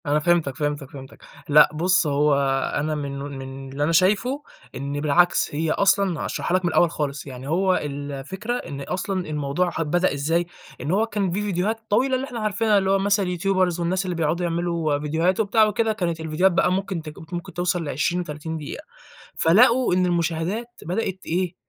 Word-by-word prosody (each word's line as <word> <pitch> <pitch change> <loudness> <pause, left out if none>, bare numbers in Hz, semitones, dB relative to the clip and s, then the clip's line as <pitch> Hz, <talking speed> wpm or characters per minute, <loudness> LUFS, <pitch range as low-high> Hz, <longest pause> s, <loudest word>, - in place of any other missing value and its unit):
أنا 145 +1 +2
فِهِمتَك، 165 -4 +1
فِهِمتَك، 145 -2 -3
فِهِمتَك، 135 -2 -12 0.3
لأ 150 +1 +7
بُص، 175 +1 +2
هو 145 +1 +2 0.4
أنا 155 +1 -1
منه 140 -2 -4
من 135 -1 -8
اللي 140 +2 -2
أنا 155 - +1
شايفه، 210 - +2 0.3
إن 140 +2 -4
بالعكس، 155 +1 +2
هي 160 +1 0
أصلًا 195 -3 +2
هاشرحها 180 - 0
لَك 185 - -3
من 175 - +1
الأول 170 +1 +3
خالص، 145 -3 -3
يعني 130 0 -8
هو 185 +4 +2
الفكرة، 145 - -4
إن 140 - -7
أصلًا 185 +4 -3
الموضوع 150 +4 -1
أ - - +2
بدأ 175 +3 +1
إزاي، 165 +5 0 0.4
إن 145 +5 -2
هو 210 +4 +3
كان 200 -5 -1
في 195 +4 -1
فيديوهات 205 +2 -1
طويلة 260 +6 +2
اللي 260 +1 -2
إحنا 240 -3 -6
عارفينها، 215 0 +2
اللي 190 -1 +1
هو 195 - +3
مثلًا 200 0 +2
الYouTubers 185 -2 +1
والناس 180 +3 0
اللي 180 -1 -2
بيقعدوا 165 +2 0
يعملوا 170 -3 -1
فيديوهاته 165 +7 +1
وبتاع 215 +2 +3
وكده. 220 +1 +1
كانت 170 -6 -2
الفيديوهات 160 +4 +2
بقى 180 - +2
ممكن 190 -2 -2
ت 155 - -8 0.2
ممكن 175 -1 -5
توصَل 175 0 -1
ل20، 170 +5 -1
30 160 +1 -6
دقيقة، 150 -2 -7 0.5
فلقوا 235 +7 +4
إن 185 0 +3
المشاهدات 175 +5 -1 0.2
بدأت 190 +2 -2
إيه، 180 +1 -1
175 Hz, 185 wpm, -23 LUFS, 150-190 Hz, 0.5 s, لأ